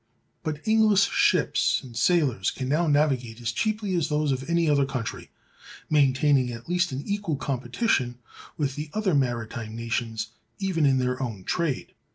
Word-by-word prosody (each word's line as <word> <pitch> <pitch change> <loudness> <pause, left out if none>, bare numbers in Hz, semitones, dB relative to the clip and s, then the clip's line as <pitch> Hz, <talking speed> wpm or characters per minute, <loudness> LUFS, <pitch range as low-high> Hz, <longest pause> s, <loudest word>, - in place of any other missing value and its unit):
But 155 +1 -5
English 215 -3 +4
ships 410 +1 +2
and 125 -3 -11
sailors 130 - +2
can 130 - -4
now 155 +5 +1
navigate 135 -6 +1
as 120 -1 -2
cheaply 210 - -1
as 170 -4 +1
those 150 -1 +1
of 135 +3 -3
any 170 -1 +2
other 145 -2 +4
country, 125 -4 -4 0.6
maintaining 135 -2 +3
at 115 0 -9
least 175 -1 +1
an 135 +2 -4
equal 205 -6 -1
competition 130 - -1 0.4
with 140 -3 -1
the 150 +1 -5
other 215 -4 +1
maritime 120 -4 -1
nations 115 -1 -3 0.3
even 180 -6 +1
in 135 -1 +3
their 125 0 -1
own 110 -7 -4
trade. 160 - -2
140 Hz, 160 wpm, -26 LUFS, 125-170 Hz, 0.6 s, English